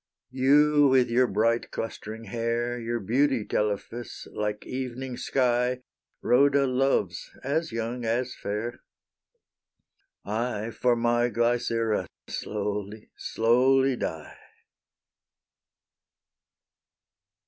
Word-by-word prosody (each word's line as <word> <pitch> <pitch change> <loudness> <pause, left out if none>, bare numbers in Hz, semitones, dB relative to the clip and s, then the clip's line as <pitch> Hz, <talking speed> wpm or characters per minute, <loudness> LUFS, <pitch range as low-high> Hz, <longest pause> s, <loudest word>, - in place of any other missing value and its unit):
You 145 +3 +5
with 130 -3 +3
your 125 +1 +4
bright 115 +3 +1
clustering 110 0 -6
hair, 115 +2 -2
Your 120 0 -2
beauty, 125 +3 +1
Telephus, 105 +3 -3
like 105 0 -3
evening's 130 0 -5
sky, 125 -1 +1 0.4
Rhoda 140 +2 +4
loves, 130 -9 0
as 150 +4 -1
young, 115 +2 -3
as 120 +3 -1
fair; 110 +4 -4 1.4
I 110 +1 -2
for 120 +1 +2
my 120 +1 +2
Glycera 115 -2 0 0.2
slowly, 105 0 -4
slowly 130 +4 +3
die. 80 -9 -5
120 Hz, 85 wpm, -27 LUFS, 110-130 Hz, 1.4 s, You